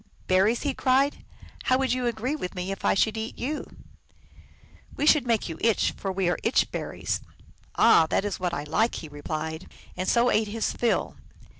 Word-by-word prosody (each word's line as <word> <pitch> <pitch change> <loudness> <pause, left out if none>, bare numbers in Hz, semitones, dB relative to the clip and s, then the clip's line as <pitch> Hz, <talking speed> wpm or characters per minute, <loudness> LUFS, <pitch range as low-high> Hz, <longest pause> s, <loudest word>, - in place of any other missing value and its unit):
" - - -31
Berries," 205 +6 +3
he 285 -2 0
cried, 270 +3 +1 0.2
" - - -16
how 255 - +4
would 260 -2 +1
you 250 -1 -1
agree 240 +5 -2
with 190 -11 -5
me 180 +1 -3
if 195 - -6
I - - +3
should 220 +3 +1
eat 220 +1 -5
you? 295 +4 -3 0.5
" - - -26
" - - -24
We 295 - 0
should 300 -4 +5
make 230 -3 +1
you 165 -2 -7
itch, 225 -2 +2
for 195 - -3
we 190 -1 -1
are 175 - 0
Itch 225 - +2
berries." - - -3 0.3
" - - -27 0.2
Ah, 165 -8 +6
that 195 - +1
is 205 - -3
what 180 -1 -1
I 145 - -3
like," 220 +10 +1
he 160 - -6
replied, 155 +3 -5 0.2
and 185 +1 -2
so 240 +1 +3
ate 215 0 +2
his 220 +2 -2
fill. 235 - 0
220 Hz, 215 wpm, -26 LUFS, 180-250 Hz, 0.5 s, Ah